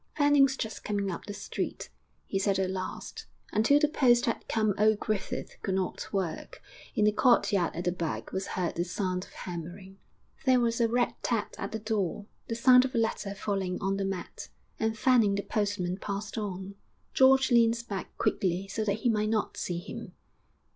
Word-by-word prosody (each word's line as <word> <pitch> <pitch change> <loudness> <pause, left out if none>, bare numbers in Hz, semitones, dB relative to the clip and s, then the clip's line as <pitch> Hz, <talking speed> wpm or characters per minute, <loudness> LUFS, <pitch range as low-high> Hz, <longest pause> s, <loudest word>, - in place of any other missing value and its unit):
'Fanning's 285 -2 +4
just 220 -3 -5
coming 200 -2 -1
up 170 - -6
the 205 - -4
street,' - - -4 0.3
he 195 - -1
said 195 0 +1
at 190 -1 0
last. 185 -1 -6 0.2
Until 225 +7 +4
the 300 - +4
post 245 -5 +4
had 230 - -2
come 215 -2 +1
old 215 0 +4
Griffith 215 -3 -3
could 190 -3 -1
not 190 -1 -3
work; 190 -5 -3 0.4
in 210 - +3
the 210 - +5
courtyard 210 -6 +3
at 175 - -3
the 180 - +1
back 170 -2 -4
was 190 +1 -3
heard 180 -2 0
the 170 - -1
sound 185 +1 -2
of - - -19
hammering. 180 +3 -8 0.4
There 255 -1 +4
was 235 0 +1
a 230 - +4
rat 240 +2 +1
tat 230 -4 -1
at 195 - -4
the 220 - -2
door, 210 -3 -2 0.2
the 230 - -2
sound 250 +1 +7
of 260 -1 -3
a - - +2
letter 215 -3 -1
falling 195 -3 -2
on 195 0 -1
the 200 - -1
mat, 195 -2 -5 0.3
and 220 0 0
Fanning 225 -4 +4
the 200 - -2
postman 200 -4 -1
passed 200 +1 -5
on. 195 -3 -4 0.4
George 265 0 +5
leaned 230 -1 +4
back 195 -2 -6
quickly 185 +1 0
so 215 +3 -2
that 215 +1 -1
he - - +1
might 215 -1 +1
not 215 -1 0
see 175 - -3
him. 175 - -8
205 Hz, 190 wpm, -29 LUFS, 190-230 Hz, 0.4 s, sound